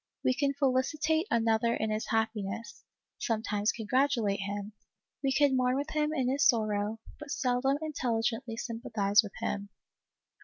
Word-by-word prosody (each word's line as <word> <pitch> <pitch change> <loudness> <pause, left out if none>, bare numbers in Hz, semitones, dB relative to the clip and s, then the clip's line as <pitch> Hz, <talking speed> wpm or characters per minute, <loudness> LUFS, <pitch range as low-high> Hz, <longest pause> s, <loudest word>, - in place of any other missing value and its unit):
We 255 - +4
can 280 +1 0
felicitate 300 +5 +1
another 230 0 +2
in 220 0 -1
his 215 +1 -2
happiness, 220 -1 -2 0.4
sometimes 215 -2 0
congratulate 230 -2 +1
him; 200 +1 -4 0.5
we 270 - +2
can 280 0 +3
mourn 255 0 +2
with 285 +3 -2
him 300 0 +1
in 265 -5 0
his 275 +3 +1
sorrow, 215 -1 +1 0.2
but 300 -1 -9
seldom 270 0 +1
in 310 -1 -4
telligently 225 -2 -1
sympathize 220 -4 +2
with 210 -4 -9
him. 200 0 -2
235 Hz, 145 wpm, -30 LUFS, 215-275 Hz, 0.5 s, We